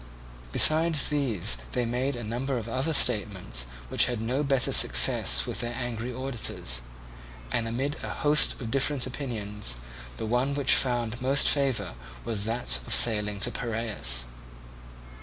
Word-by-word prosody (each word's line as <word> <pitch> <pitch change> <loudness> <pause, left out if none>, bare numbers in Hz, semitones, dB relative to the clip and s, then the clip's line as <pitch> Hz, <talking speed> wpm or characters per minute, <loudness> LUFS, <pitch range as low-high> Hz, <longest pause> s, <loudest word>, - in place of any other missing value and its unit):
Besides 155 - +4
these 120 - 0 0.2
they 125 -1 -1
made 125 +4 -2
a 120 - -6
number 125 +5 -3
of 115 -1 -6
other 130 +7 -2
statements 100 - +1 0.2
which - - +3
had 120 -2 -3
no 125 +5 -2
better 135 -3 0
success 60 0 +4
with - - -5
their 120 0 -4
angry 120 -1 -4
auditors; 120 - -3 0.7
and 115 - -1
amid 135 +6 -3
a - - -5
host 150 0 +2
of 115 -4 -6
different 135 0 0
opinions 105 - -4 0.4
the - - -5
one 125 +5 -1
which 140 -2 +5
found 120 -2 0
most 135 +2 +2
favour 135 - 0 0.3
was 105 -3 -3
that 65 - -1
of - - +4
sailing 105 -3 +3
to 120 - +1
Piraeus. 110 - -2
120 Hz, 145 wpm, -26 LUFS, 105-135 Hz, 0.7 s, which